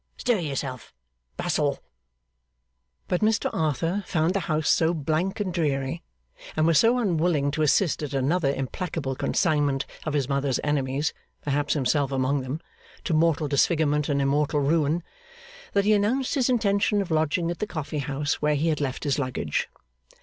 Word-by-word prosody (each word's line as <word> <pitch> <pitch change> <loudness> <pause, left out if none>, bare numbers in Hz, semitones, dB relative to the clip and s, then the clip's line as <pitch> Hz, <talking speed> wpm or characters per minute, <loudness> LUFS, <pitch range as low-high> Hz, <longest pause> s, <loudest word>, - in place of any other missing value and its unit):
Stir 240 -4 +1
yourself. 135 - -5 0.4
Bustle.' 150 -5 0 1.3
But 180 - 0
Mr 220 +1 +2
Arthur 165 +6 0
found 160 +1 +1
the 195 - +1
house 155 -1 0
so 165 +1 +3
blank 160 +7 -1
and 190 -4 -2
dreary, 145 -2 -1 0.6
and 155 - +3
was 165 -1 +5
so 235 +2 +4
unwilling 170 - +1
to 155 - -2
assist 155 +3 +2
at 150 -3 -4
another 140 +2 +1
implacable 140 +1 -3
consignment 145 -3 +1 0.2
of 155 - -3
his 140 -4 0
mother's 140 -2 0
enemies 145 0 0 0.3
(perhaps 145 +1 0
himself 140 0 +1
among 135 +1 +1
them) 130 +5 -5 0.4
to 175 - -1
mortal 160 -1 +2
disfigurement 150 +1 +2
and 140 -1 +1
immortal 145 +1 +1
ruin, 155 +3 +1 0.7
that 200 0 +2
he 215 - +5
announced 225 +6 +1
his 270 -4 +1
intention 205 -3 +2
of 180 - -9
lodging 160 +2 +1
at 175 - -6
the 210 - -2
coffee 155 -4 -4
house 145 +1 -2
where 150 0 +2
he 155 +3 +1
had 150 -2 0
left 130 -3 -2
his 145 -1 0
luggage. 125 - -2
155 Hz, 160 wpm, -25 LUFS, 140-175 Hz, 1.3 s, was